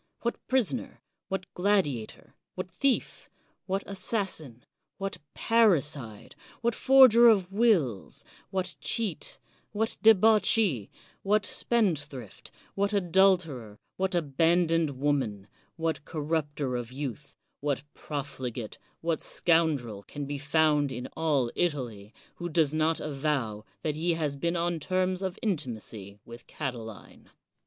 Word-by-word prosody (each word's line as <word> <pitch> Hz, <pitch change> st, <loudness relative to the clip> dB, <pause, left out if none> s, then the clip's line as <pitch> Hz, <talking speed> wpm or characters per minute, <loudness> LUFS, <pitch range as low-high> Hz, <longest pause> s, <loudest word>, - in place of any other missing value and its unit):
What 235 Hz, -, -2 dB
prisoner, 240 Hz, -, 0 dB, 0.3 s
what 190 Hz, -1 st, -3 dB
gladiator, 180 Hz, -, 0 dB, 0.2 s
what 185 Hz, -1 st, -5 dB
thief, 260 Hz, +9 st, -1 dB, 0.4 s
what 195 Hz, +1 st, -1 dB
assassin, 190 Hz, -, -3 dB, 0.3 s
what 195 Hz, -1 st, -4 dB, 0.2 s
parricide, 150 Hz, -, +1 dB, 0.3 s
what 235 Hz, 0 st, +1 dB
forger 255 Hz, -2 st, +7 dB
of 195 Hz, -5 st, +4 dB
wills, 195 Hz, -, +1 dB, 0.2 s
what 185 Hz, -2 st, -3 dB
cheat, 215 Hz, -9 st, -1 dB, 0.4 s
what 220 Hz, +2 st, -1 dB
debauchee, 215 Hz, -, +4 dB, 0.3 s
what 205 Hz, +1 st, +2 dB
spendthrift, 150 Hz, -, -1 dB, 0.2 s
what 200 Hz, +1 st, 0 dB
adulterer, 175 Hz, -, +2 dB, 0.2 s
what 190 Hz, -1 st, -1 dB
abandoned 165 Hz, -1 st, +2 dB
woman, 130 Hz, -9 st, 0 dB, 0.3 s
what 165 Hz, -2 st, -2 dB
corrupter 150 Hz, -4 st, -2 dB
of 120 Hz, -1 st, -4 dB
youth, 140 Hz, +1 st, -6 dB, 0.2 s
what 140 Hz, -2 st, -1 dB
profligate, 130 Hz, -6 st, -5 dB, 0.2 s
what 165 Hz, -1 st, 0 dB
scoun 160 Hz, -3 st, +3 dB
drel 110 Hz, -6 st, -8 dB
can 145 Hz, +7 st, -7 dB
be 140 Hz, 0 st, -4 dB
found 150 Hz, -1 st, +2 dB
in 125 Hz, 0 st, -5 dB
all 145 Hz, -7 st, +1 dB
Italy, 120 Hz, -11 st, -2 dB, 0.3 s
who 175 Hz, 0 st, -4 dB
does 155 Hz, -2 st, +2 dB
not 155 Hz, +1 st, +1 dB
avow 135 Hz, -7 st, -2 dB, 0.2 s
that 150 Hz, -2 st, -1 dB
he 165 Hz, +2 st, 0 dB
has 150 Hz, -3 st, -1 dB
been 170 Hz, +5 st, -1 dB
on 170 Hz, -1 st, 0 dB
terms 185 Hz, +3 st, 0 dB
of 190 Hz, -2 st, -3 dB
intimacy 115 Hz, -, -4 dB
with 120 Hz, 0 st, -12 dB
Cati 130 Hz, -5 st, -4 dB
line? 110 Hz, -2 st, -12 dB
160 Hz, 120 wpm, -28 LUFS, 135-190 Hz, 0.4 s, forger